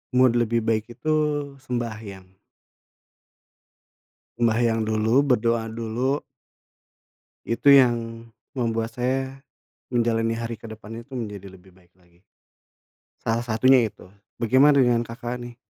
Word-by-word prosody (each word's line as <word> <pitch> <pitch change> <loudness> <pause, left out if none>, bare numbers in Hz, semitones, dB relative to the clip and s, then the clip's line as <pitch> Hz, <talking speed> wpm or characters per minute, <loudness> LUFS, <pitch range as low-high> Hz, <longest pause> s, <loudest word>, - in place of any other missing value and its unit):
mood 130 -1 +5
lebih 115 -1 +1
baik 110 0 0
itu 155 0 0 0.5
sembahyang. 110 -7 -6 2.0
Sembahyang 115 -1 +2
dulu, 110 +4 +2
berdoa 115 -4 +1
dulu 115 +5 -1 1.3
itu 115 +5 0
yang 120 -4 +4 0.3
membuat 115 -1 -2
saya, 130 +2 -1 0.6
menjalani 115 -1 +1
hari 115 0 -4
ke 110 - -23
depan 110 +1 -9
itu 135 - -27
menjadi 105 -6 -6
lebih 95 0 -18
baik 90 -2 -25
lagi. 90 +1 -29 1.0
Salah 115 +1 0
satunya 120 +1 +4
itu. 100 -3 -15 0.2
Bagaimana 130 +5 +4
dengan 120 -1 +3
Kakak, 120 +1 -5
nih? 120 -1 -9
115 Hz, 110 wpm, -24 LUFS, 110-120 Hz, 2.0 s, mood